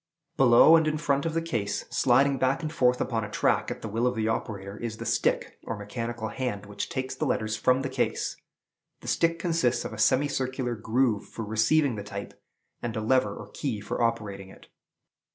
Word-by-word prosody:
Below 130 Hz, +5 st, +7 dB
and 160 Hz, -1 st, +2 dB
in 155 Hz, 0 st, 0 dB
front 140 Hz, -1 st, 0 dB
of 160 Hz, -, -3 dB
the 165 Hz, -, 0 dB
case, 105 Hz, -10 st, -2 dB
sliding 135 Hz, +2 st, +3 dB
back 130 Hz, +5 st, +1 dB
and 155 Hz, 0 st, -3 dB
forth 125 Hz, -4 st, +3 dB
upon 115 Hz, -4 st, -1 dB
a 105 Hz, -, -5 dB
track -, -, +1 dB
at -, -, -6 dB
the -, -, -3 dB
will 115 Hz, +4 st, 0 dB
of 125 Hz, -, 0 dB
the 110 Hz, -1 st, 0 dB
operator, 100 Hz, -3 st, -3 dB
is 115 Hz, -1 st, -5 dB
the -, -, -6 dB
stick, -, -, 0 dB
or 115 Hz, -, -4 dB
mechanical 115 Hz, +2 st, -4 dB
hand, 120 Hz, -6 st, -3 dB
which 100 Hz, 0 st, -5 dB
takes 130 Hz, 0 st, -3 dB
the -, -, -2 dB
letters 110 Hz, 0 st, 0 dB
from 130 Hz, +3 st, +2 dB
the -, -, -1 dB
case. 130 Hz, -1 st, -1 dB, 0.7 s
The -, -, -11 dB
stick 165 Hz, 0 st, +2 dB
consists 165 Hz, -8 st, 0 dB
of -, -, -5 dB
a 110 Hz, -, -8 dB
semicircular 130 Hz, 0 st, +1 dB
groove 115 Hz, 0 st, 0 dB
for 115 Hz, -, -6 dB
receiving 110 Hz, +5 st, +2 dB
the 105 Hz, -, -5 dB
type, 100 Hz, 0 st, -7 dB, 0.5 s
and 120 Hz, -2 st, -3 dB
a -, -, -1 dB
lever 130 Hz, +4 st, +2 dB
or -, -, -9 dB
key 130 Hz, -8 st, -3 dB
for 105 Hz, +3 st, -4 dB
operating 100 Hz, -4 st, -1 dB
it. -, -, -15 dB
120 Hz, 205 wpm, -27 LUFS, 110-135 Hz, 0.7 s, Below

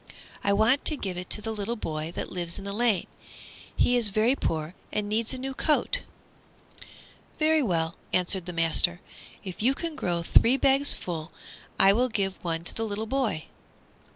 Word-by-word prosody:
"I 200 Hz, -, +2 dB
want 220 Hz, +7 st, +4 dB
to 305 Hz, -, +3 dB
give 190 Hz, -7 st, -4 dB
it 180 Hz, 0 st, -6 dB
to 210 Hz, -, +1 dB
the 225 Hz, -, -2 dB
little 215 Hz, +2 st, -3 dB
boy 155 Hz, -6 st, -4 dB
that -, -, -4 dB
lives 175 Hz, -2 st, -3 dB
in 195 Hz, -, -8 dB
the 200 Hz, -, -4 dB
lane. 220 Hz, -4 st, +2 dB, 0.7 s
He 245 Hz, -, +3 dB
is 240 Hz, -3 st, +2 dB
very 220 Hz, +6 st, +2 dB
poor 160 Hz, -, -2 dB, 0.2 s
and 210 Hz, -1 st, -2 dB
needs 220 Hz, +2 st, 0 dB
a 260 Hz, -, -3 dB
new 265 Hz, +1 st, -4 dB
coat." 300 Hz, +3 st, +2 dB, 1.4 s
"Very 315 Hz, 0 st, +3 dB
well," 165 Hz, -, 0 dB, 0.2 s
answered 180 Hz, 0 st, +1 dB
the -, -, -3 dB
master; 165 Hz, +1 st, +2 dB, 0.4 s
"if 185 Hz, -1 st, -6 dB
you 260 Hz, +5 st, +3 dB
can 330 Hz, 0 st, -4 dB
grow 175 Hz, -, -1 dB
three 240 Hz, +9 st, +4 dB
bags 275 Hz, +1 st, +3 dB
full 160 Hz, -3 st, -6 dB, 0.5 s
I 195 Hz, 0 st, +7 dB
will 250 Hz, +4 st, +2 dB
give 195 Hz, -4 st, -2 dB
one 165 Hz, -1 st, -2 dB
to -, -, -8 dB
the 225 Hz, -, -3 dB
little 215 Hz, +1 st, -3 dB
boy." 235 Hz, -9 st, -1 dB
205 Hz, 180 wpm, -27 LUFS, 175-245 Hz, 1.4 s, I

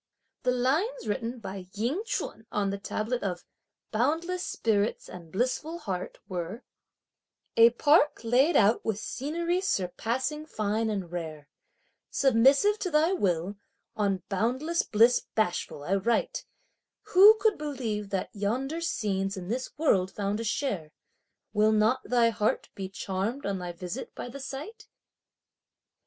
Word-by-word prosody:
The 250 Hz, -, 0 dB
lines 305 Hz, -, 0 dB
written 230 Hz, +3 st, -2 dB
by 195 Hz, -4 st, -7 dB
Ying 245 Hz, -, 0 dB
Ch'un 220 Hz, -, -4 dB
on 200 Hz, -1 st, 0 dB
the 200 Hz, -, -4 dB
tablet 225 Hz, +5 st, -2 dB
of 180 Hz, -3 st, -3 dB, 0.5 s
"Boundless 325 Hz, +10 st, 0 dB
spirits 215 Hz, -1 st, 0 dB
and 170 Hz, -3 st, -11 dB
blissful 255 Hz, -, -1 dB
heart" 190 Hz, -, -5 dB
were: 185 Hz, +6 st, -5 dB, 0.9 s
A 230 Hz, 0 st, +8 dB
park 295 Hz, +5 st, +3 dB
laid 255 Hz, +8 st, +3 dB
out 215 Hz, +2 st, +4 dB
with 220 Hz, -3 st, -1 dB
scenery 335 Hz, +9 st, -2 dB
surpassing 260 Hz, -, -1 dB
fine 215 Hz, -2 st, -1 dB
and 195 Hz, -5 st, -3 dB
rare! 155 Hz, -4 st, -6 dB, 0.6 s
Submissive 275 Hz, -, +4 dB
to 365 Hz, -, -2 dB
thy 315 Hz, +3 st, +3 dB
will, 190 Hz, -, 0 dB, 0.4 s
on 200 Hz, -3 st, 0 dB
boundless 255 Hz, -, 0 dB
bliss 230 Hz, +3 st, +4 dB
bashful 175 Hz, -8 st, -1 dB
I 190 Hz, +6 st, +1 dB
write! 235 Hz, -, 0 dB, 0.7 s
Who 410 Hz, +4 st, +9 dB
could 435 Hz, -3 st, +2 dB
believe 235 Hz, -9 st, -3 dB
that 195 Hz, -2 st, -3 dB
yonder 255 Hz, +10 st, -2 dB
scenes 195 Hz, -, -1 dB
in 180 Hz, 0 st, -6 dB
this 255 Hz, +3 st, -2 dB
world 195 Hz, -, +3 dB
found 200 Hz, +1 st, -2 dB
a -, -, -2 dB
share! 210 Hz, -, -2 dB, 0.6 s
Will 215 Hz, 0 st, +4 dB
not 220 Hz, +4 st, +3 dB
thy 235 Hz, -2 st, +3 dB
heart 210 Hz, 0 st, 0 dB
be 190 Hz, -1 st, -5 dB
charmed 200 Hz, +7 st, -3 dB
on 195 Hz, -1 st, -1 dB
thy 180 Hz, -1 st, -4 dB
visit 180 Hz, +8 st, -7 dB
by -, -, -6 dB
the 275 Hz, +3 st, -8 dB
sight? 280 Hz, +11 st, -7 dB
225 Hz, 140 wpm, -28 LUFS, 195-280 Hz, 0.9 s, Who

